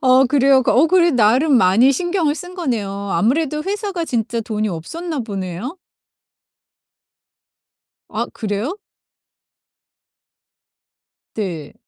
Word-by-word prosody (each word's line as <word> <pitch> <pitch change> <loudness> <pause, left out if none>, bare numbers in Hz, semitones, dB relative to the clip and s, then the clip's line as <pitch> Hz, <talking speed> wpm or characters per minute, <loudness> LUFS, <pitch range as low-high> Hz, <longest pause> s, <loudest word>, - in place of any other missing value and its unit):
어 260 0 +5
그래요? 270 0 +4
어 285 +6 +4
그래 345 -1 +4
나름 250 +6 +3
많이 230 +7 +4
신경을 345 -1 0
쓴 355 +4 -9
거네요. 240 - -2 0.2
아무래도 300 +6 +1
회사가 395 -3 -3
진짜 235 -4 -2
돈이 215 -1 -2
없었나 300 - -5
보네요? 200 - -5 2.3
아, - - -2
그래요? 220 - -3 2.6
네. 175 -9 -5
260 Hz, 200 characters per minute, -19 LUFS, 215-325 Hz, 2.6 s, 어